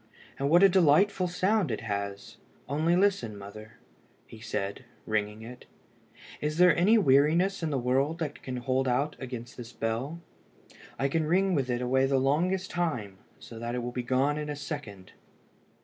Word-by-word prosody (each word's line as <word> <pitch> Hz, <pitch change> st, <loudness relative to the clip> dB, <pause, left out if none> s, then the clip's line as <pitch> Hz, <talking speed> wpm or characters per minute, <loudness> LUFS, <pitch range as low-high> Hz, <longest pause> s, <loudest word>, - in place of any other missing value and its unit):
And 140 Hz, +1 st, 0 dB
what 175 Hz, +4 st, +6 dB
a -, -, +10 dB
delightful 185 Hz, +1 st, +3 dB
sound 185 Hz, +1 st, +1 dB
it 110 Hz, -, -3 dB
has! 100 Hz, -2 st, -5 dB, 0.3 s
Only 155 Hz, +5 st, +1 dB
listen, 180 Hz, -, +1 dB
mother," 110 Hz, +2 st, -11 dB, 0.7 s
said 100 Hz, -3 st, -3 dB
he, -, -, -19 dB, 0.2 s
ringing 105 Hz, 0 st, -2 dB
it; 125 Hz, +2 st, -11 dB, 0.7 s
"is 150 Hz, +1 st, -2 dB
there 180 Hz, -2 st, +6 dB
any 205 Hz, +7 st, +4 dB
weariness 165 Hz, +4 st, +3 dB
in 165 Hz, -, -1 dB
the 140 Hz, -, -1 dB
world 135 Hz, +6 st, 0 dB
that 155 Hz, -4 st, -5 dB
can 130 Hz, -1 st, -5 dB
hold 130 Hz, +1 st, 0 dB
out 140 Hz, +4 st, 0 dB
against 125 Hz, -2 st, -7 dB
this 120 Hz, -1 st, -9 dB
bell? 120 Hz, +10 st, -3 dB, 0.8 s
I 135 Hz, -, +1 dB
can 155 Hz, +2 st, -1 dB
ring 190 Hz, +3 st, +2 dB
with 135 Hz, -5 st, 0 dB
it 120 Hz, 0 st, -1 dB
away 130 Hz, +2 st, +2 dB
the 135 Hz, 0 st, +2 dB
longest 175 Hz, +8 st, 0 dB
time, 120 Hz, -, -3 dB, 0.2 s
so 115 Hz, -, -11 dB
that 120 Hz, +1 st, -4 dB
it 125 Hz, -, -3 dB
will 120 Hz, -, -4 dB
be 125 Hz, -, -3 dB
gone 130 Hz, +4 st, +1 dB
in 150 Hz, 0 st, -5 dB
a 150 Hz, -, -3 dB
second." 140 Hz, -, -7 dB
135 Hz, 175 wpm, -28 LUFS, 120-165 Hz, 0.8 s, a